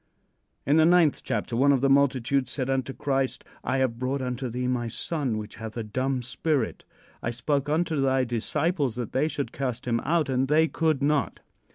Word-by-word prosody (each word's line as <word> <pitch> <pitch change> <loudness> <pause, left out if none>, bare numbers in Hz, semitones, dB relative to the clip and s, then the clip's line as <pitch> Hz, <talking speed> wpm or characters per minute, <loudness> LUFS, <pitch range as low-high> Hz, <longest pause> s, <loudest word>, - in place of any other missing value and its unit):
In 145 +3 +3
the 160 - +6
ninth 170 -4 +4
chapter 115 -1 -2
one 140 +4 +4
of 135 -3 +2
the 135 - +3
multitude 135 -1 +2
said 130 0 -2
unto 135 0 -1
Christ: 135 -1 -1 0.2
"I 130 +2 0
have 130 -3 0
brought 130 +2 -1
unto 125 0 -3
thee 125 +2 -2
my 125 -2 -1
son 130 0 -2
which 105 +1 -7
hath 110 +1 -7
a 115 - -2
dumb 130 +4 -2
spirit. 135 +1 -1 0.4
I - - -2
spoke 140 +4 -1
unto 155 -1 +1
thy 135 -1 +2
disciples 130 - -1
that 120 -3 -4
they 135 +4 +1
should 140 -6 -3
cast 130 -3 -4
him 115 -1 +1
out, 160 +3 +1
and 130 0 +1
they 155 +3 +4
could 155 -4 0
not." 140 - 0
135 Hz, 195 wpm, -26 LUFS, 125-145 Hz, 0.4 s, the